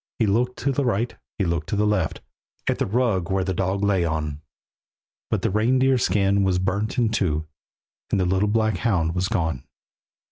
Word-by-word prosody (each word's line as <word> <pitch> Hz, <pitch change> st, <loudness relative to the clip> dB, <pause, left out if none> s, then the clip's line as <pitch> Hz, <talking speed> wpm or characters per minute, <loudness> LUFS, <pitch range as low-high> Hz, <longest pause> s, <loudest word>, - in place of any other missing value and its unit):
He 115 Hz, -, +2 dB
looked 120 Hz, +5 st, +1 dB
to 140 Hz, -, 0 dB
the 140 Hz, +2 st, 0 dB
right, 120 Hz, -1 st, 0 dB, 0.2 s
he 100 Hz, -, 0 dB
looked 85 Hz, -3 st, -2 dB
to -, -, 0 dB
the 105 Hz, +1 st, +2 dB
left, 105 Hz, -6 st, 0 dB, 0.5 s
At -, -, 0 dB
the -, -, 0 dB
rug 105 Hz, -5 st, +1 dB
where 95 Hz, 0 st, +1 dB
the 95 Hz, 0 st, -1 dB
dog 95 Hz, +2 st, -1 dB
lay 100 Hz, -3 st, +2 dB
on; 75 Hz, -3 st, -2 dB, 0.9 s
But -, -, -1 dB
the -, -, +1 dB
reindeer 130 Hz, +5 st, +3 dB
skin 100 Hz, 0 st, +2 dB
was 95 Hz, -2 st, +2 dB
burnt 100 Hz, +6 st, -1 dB
in 120 Hz, -3 st, +3 dB
two, 80 Hz, -8 st, 0 dB, 0.6 s
And 100 Hz, -, +1 dB
the 90 Hz, -, +2 dB
little 95 Hz, +3 st, +1 dB
black 110 Hz, -2 st, +1 dB
hound 85 Hz, -7 st, +1 dB
was 90 Hz, +1 st, 0 dB
gone. 80 Hz, -, -1 dB
100 Hz, 190 wpm, -24 LUFS, 90-110 Hz, 0.9 s, reindeer